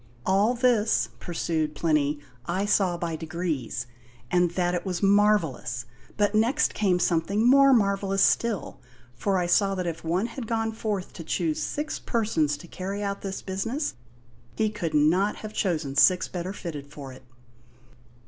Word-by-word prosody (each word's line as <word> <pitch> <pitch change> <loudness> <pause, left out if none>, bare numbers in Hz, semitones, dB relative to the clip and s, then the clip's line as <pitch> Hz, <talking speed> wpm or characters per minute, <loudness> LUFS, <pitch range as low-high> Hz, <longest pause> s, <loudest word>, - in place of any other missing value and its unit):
"All 200 +6 +3
this," 235 -3 +2
pursued 160 -3 -2
Plinny, 150 -2 +1 0.3
"I 185 +4 0
saw 190 -4 +2
by 170 -1 -3
degrees, 160 -8 -3 0.5
and 175 -1 +3
that 175 +1 0
it 175 - -1
was 180 -2 -3
marvellous; 195 - +2 0.3
but 205 0 +2
next 225 +5 +2
came 190 -4 +2
something 180 +6 +1
more 275 +1 +7
marvellous 195 -4 +2
still, 230 -5 0 0.3
for 190 +11 0
I 180 - +1
saw 195 +3 +2
that 185 -1 -3
if 165 -1 -4
one 175 +6 0
had 235 0 -6
gone 225 -1 -1
forth 210 -4 -4
to 165 - -8
choose 160 -1 -1
six 300 +1 -3
persons 165 - 0
to 160 - -12
carry 195 +4 -5
out 200 0 -3
this 195 -1 -5
business, 225 +10 -2 0.6
he 215 -1 +1
could 170 -7 -3
not 175 +8 +3
have 215 0 -8
chosen 155 -10 -1
six 180 +6 +5
better 180 +1 -4
fitted 155 -8 -7
for 140 -2 -9
it." 130 - -14
185 Hz, 160 wpm, -26 LUFS, 165-210 Hz, 0.6 s, more